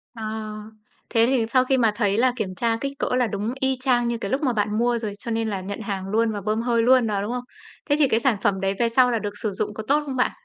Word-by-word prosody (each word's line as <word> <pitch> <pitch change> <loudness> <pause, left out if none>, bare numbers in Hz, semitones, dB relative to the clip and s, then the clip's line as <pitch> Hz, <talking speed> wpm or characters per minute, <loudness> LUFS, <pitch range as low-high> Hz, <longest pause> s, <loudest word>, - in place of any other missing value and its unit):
Ờ, 225 - -7 0.9
thế 230 -1 +4
thì 255 -4 +2
sau 255 +1 +4
khi 265 0 +2
mà 230 -3 +3
thấy 205 -2 +1
là 255 +2 +4
kiểm 190 -6 -3
tra 230 +2 0
kích 275 0 -3
cỡ - - 0
là 250 -2 +2
đúng 210 +4 -3
y 265 0 +1
chang 250 -2 +2
như 235 0 -1
cái 200 -3 -5
lúc 270 - 0
mà 260 -5 +1
bạn 210 0 0
mua 240 0 +2
rồi, 215 -3 -4
cho 230 - -5
nên 225 0 0
là 195 -2 -3
nhận 200 +3 -6
hàng 195 -2 -4
luôn 225 +1 +2
và 205 - -4
bơm 215 +3 -1
hơi 235 -1 +1
luôn 255 -1 +5
đó, 205 -2 -1
đúng 210 +4 -3
không? 250 0 -3 0.5
Thế 290 - +4
thì 285 - +5
cái 225 - +2
sản 235 -3 +2
phẩm 195 -2 +1
đấy 195 0 +1
về 235 - +2
sau 250 +1 +4
là 230 - 0
được 205 -1 -5
sử 215 - -1
dụng 205 +2 -3
có 220 0 -6
tốt 290 +2 +3
không 270 -2 -4
bạn? 255 - +2
230 Hz, 300 wpm, -23 LUFS, 210-250 Hz, 0.9 s, luôn